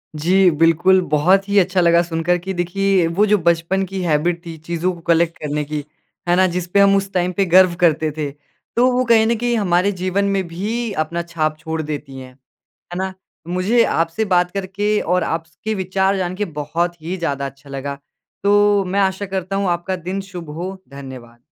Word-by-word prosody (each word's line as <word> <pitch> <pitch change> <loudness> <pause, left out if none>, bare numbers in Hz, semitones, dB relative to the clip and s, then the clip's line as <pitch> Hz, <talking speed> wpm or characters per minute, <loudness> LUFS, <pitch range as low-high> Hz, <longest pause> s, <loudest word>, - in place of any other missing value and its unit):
जी, 180 +5 +4
बिल्कुल। 165 +4 +4
बहुत 180 +7 +3
ही 200 - +2
अच्छा 185 0 +2
लगा 170 0 +4
सुनकर 170 +1 0
कि 190 +2 -5
देखिए 185 +1 +1
वो 180 +6 +2
जो 210 0 +3
बचपन 170 +2 +1
की 190 0 -5
हैबिट 170 +1 0
थी, 165 -1 -7
चीज़ों 170 +3 -2
को 170 - -12
कलेक्ट 165 0 +2
करने 150 0 -2
की, 150 0 -4 0.5
है 175 - +4
ना? 185 +1 +4
जिस 180 0 -3
पे 190 +3 +2
हम 200 0 +6
उस 195 0 -1
टाइम 180 -1 +1
पे 195 - +3
गर्व 185 0 +5
करते 160 -2 +3
थे, 150 -2 -2 0.5
तो 250 +2 +4
वो 250 0 +1
कहीं 230 -2 +5
न 235 - +2
कहीं 240 +1 0
हमारे 185 -1 +2
जीवन 185 +1 -1
में 190 - 0
भी 215 +7 -3
अपना 170 +2 -4
छाप 160 -3 -2
छोड़ 160 0 -3
देती 145 -3 -6
हैं, 130 -1 -11 0.4
है 175 - -11
ना? 190 0 -3 0.3
मुझे 185 +7 +2
आपसे 165 +3 0
बात 175 0 +2
करके 200 +2 -1
और 180 +1 +1
आप 165 0 -2
स 160 0 -29
के 220 - -1
विचार 190 +1 0
जान 185 -1 -2
के 210 +2 -2
बहुत 165 +2 -3
ही 175 +4 -4
ज़्यादा 140 -5 -2
अच्छा 135 +1 -10
लगा। 140 +1 -5 0.5
तो, 205 0 +4
मैं 190 +2 -1
आशा 190 +1 0
करता 190 0 -4
हूँ, 195 0 0
आपका 175 +2 -1
दिन 185 +3 -4
शुभ 175 -4 -8
हो, 185 +4 -5
धन्यवाद। 130 -4 -11
180 Hz, 205 wpm, -19 LUFS, 165-195 Hz, 0.5 s, हम